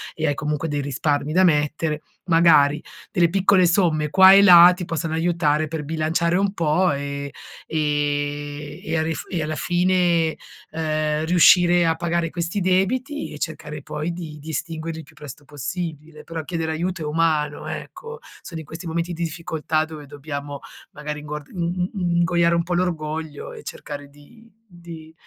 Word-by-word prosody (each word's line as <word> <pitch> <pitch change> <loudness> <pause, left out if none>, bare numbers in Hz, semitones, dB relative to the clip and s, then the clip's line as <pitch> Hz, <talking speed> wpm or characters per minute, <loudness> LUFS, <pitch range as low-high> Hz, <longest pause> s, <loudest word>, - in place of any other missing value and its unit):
e 160 - -2
hai 145 - +2
comunque 150 +2 -2
dei 145 -2 -2
risparmi 145 +1 -1
da 185 +3 +4
mettere, 150 -1 +1 0.2
magari 165 -4 +4 0.3
delle 170 -1 +3
piccole 190 0 +4
somme 165 -4 +2
qua 190 +3 +8
e 200 - +8
là, 180 -2 +9
ti 180 - -6
possono 165 -1 -3
aiutare 160 -2 +1
per 155 -1 -4
bilanciare 160 +2 0
un 195 0 +1
po' 170 +1 +2
e 140 0 -4 0.4
ehm, 145 -1 -2
e 160 +1 -2
a 160 - +1
ris 160 0 -3
e 170 -4 -2
alla 155 0 -3
fine, 175 +1 +1 0.4
ehm, 155 -1 -1
riuscire 175 0 +5
a 165 - +3
pagare 170 -1 -1
questi 175 +3 -2
debiti 250 +11 0
e 150 - -8
cercare 150 -2 -5
poi 155 +3 -4
di 160 -3 -7
di 155 +2 -10
estinguerli 160 0 -4
il 160 - -10
più 160 - -19
presto 145 -1 -11
possibile. 155 +1 -6
Però 165 -1 -6
chiedere 160 0 -3
aiuto 170 +1 -3
è - - -4
umano, 150 -1 0
ecco, 465 0 -7 0.2
sono 165 -2 -8
in 160 - -9
questi 165 +4 -9
momenti 165 +1 -1
di 170 -1 -5
difficoltà 160 -1 -2
dove 155 -2 -9
dobbiamo, 145 0 -7 0.3
magari 150 0 -6
inguard 150 -1 -7
in 180 0 -2
in 175 -4 -1
ingoiare 170 -1 +3
un 170 - +1
po' 175 +1 -3
l'orgoglio 160 -4 -3
e - - -10
cercare 145 -1 -8
di 150 +12 -19 0.2
di 170 -4 -12
160 Hz, 170 wpm, -22 LUFS, 150-175 Hz, 0.4 s, là